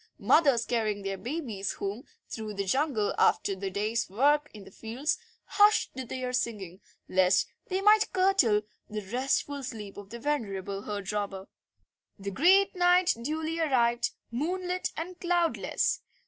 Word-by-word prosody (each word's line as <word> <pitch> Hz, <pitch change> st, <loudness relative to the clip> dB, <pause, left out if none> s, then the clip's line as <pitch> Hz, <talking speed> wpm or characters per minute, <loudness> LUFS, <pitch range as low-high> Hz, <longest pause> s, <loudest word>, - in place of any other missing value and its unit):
Mothers 275 Hz, -8 st, +4 dB
carrying 215 Hz, -4 st, -1 dB
their 195 Hz, 0 st, -2 dB
babies 235 Hz, -, -3 dB
home 200 Hz, +5 st, -5 dB, 0.2 s
through 215 Hz, -2 st, -6 dB
the 200 Hz, 0 st, -2 dB
jungle 260 Hz, -1 st, +1 dB
after 195 Hz, -, +3 dB
the 195 Hz, +1 st, -4 dB
day's 210 Hz, +4 st, -1 dB
work 290 Hz, +8 st, +2 dB
in 210 Hz, -2 st, -11 dB
the -, -, -14 dB
fields 250 Hz, -, -2 dB, 0.3 s
hushed 420 Hz, +1 st, +4 dB
their 255 Hz, 0 st, -4 dB
singing 200 Hz, -7 st, -3 dB, 0.3 s
lest 185 Hz, +1 st, +3 dB, 0.2 s
they 380 Hz, -2 st, -1 dB
might 425 Hz, +1 st, +5 dB
curtail 370 Hz, -, +3 dB, 0.3 s
the 215 Hz, 0 st, -4 dB
restful 270 Hz, +2 st, 0 dB
sleep 215 Hz, -6 st, -7 dB
of 200 Hz, -1 st, -10 dB
the 235 Hz, -, -7 dB
venerable 200 Hz, -8 st, -3 dB
herd 205 Hz, -2 st, -4 dB
robber. 200 Hz, -2 st, -3 dB, 0.7 s
The 200 Hz, -1 st, -5 dB
great 380 Hz, -, +4 dB
night 355 Hz, 0 st, +4 dB
duly 315 Hz, +5 st, -2 dB
arrived, 240 Hz, -6 st, +2 dB, 0.2 s
moonlit 360 Hz, +8 st, -2 dB
and 350 Hz, +3 st, -6 dB
cloudless. 345 Hz, -2 st, 0 dB
240 Hz, 140 wpm, -29 LUFS, 205-320 Hz, 0.7 s, might